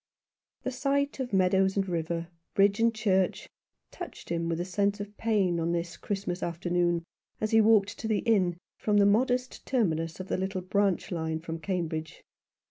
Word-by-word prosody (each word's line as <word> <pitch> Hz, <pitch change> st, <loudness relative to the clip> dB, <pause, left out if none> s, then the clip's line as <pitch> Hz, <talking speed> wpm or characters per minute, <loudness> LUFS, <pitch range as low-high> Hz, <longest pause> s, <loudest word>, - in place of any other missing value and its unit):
The 260 Hz, -, -2 dB
sight 280 Hz, +2 st, 0 dB
of 255 Hz, -2 st, -3 dB
meadows 190 Hz, 0 st, +3 dB
and 195 Hz, -1 st, +1 dB
river, 170 Hz, -1 st, -2 dB, 0.3 s
bridge 200 Hz, +2 st, +4 dB
and 230 Hz, 0 st, +4 dB
church, 195 Hz, -5 st, +1 dB, 0.4 s
touched -, -, -9 dB
him 170 Hz, 0 st, -1 dB
with 165 Hz, 0 st, -1 dB
a 175 Hz, -, -1 dB
sense 200 Hz, +2 st, 0 dB
of 205 Hz, 0 st, -7 dB
pain 200 Hz, -7 st, +1 dB
on 165 Hz, +1 st, 0 dB
this 170 Hz, 0 st, -2 dB
Christmas 195 Hz, -3 st, -3 dB
afternoon, 175 Hz, 0 st, 0 dB, 0.4 s
as 215 Hz, -, -1 dB
he 225 Hz, 0 st, +6 dB
walked 215 Hz, -1 st, +3 dB
to 225 Hz, -, -3 dB
the 215 Hz, -2 st, +1 dB
inn, 185 Hz, -7 st, +3 dB, 0.2 s
from 210 Hz, -1 st, +2 dB
the 200 Hz, -, +6 dB
modest 250 Hz, +4 st, +1 dB
terminus 165 Hz, -10 st, 0 dB
of 185 Hz, -, -6 dB
a -, -, +1 dB
little 190 Hz, 0 st, -2 dB
branch 195 Hz, 0 st, 0 dB
line 160 Hz, -2 st, -2 dB
from 165 Hz, 0 st, -6 dB
Cambridge. 160 Hz, -4 st, -3 dB
190 Hz, 175 wpm, -29 LUFS, 170-215 Hz, 0.4 s, he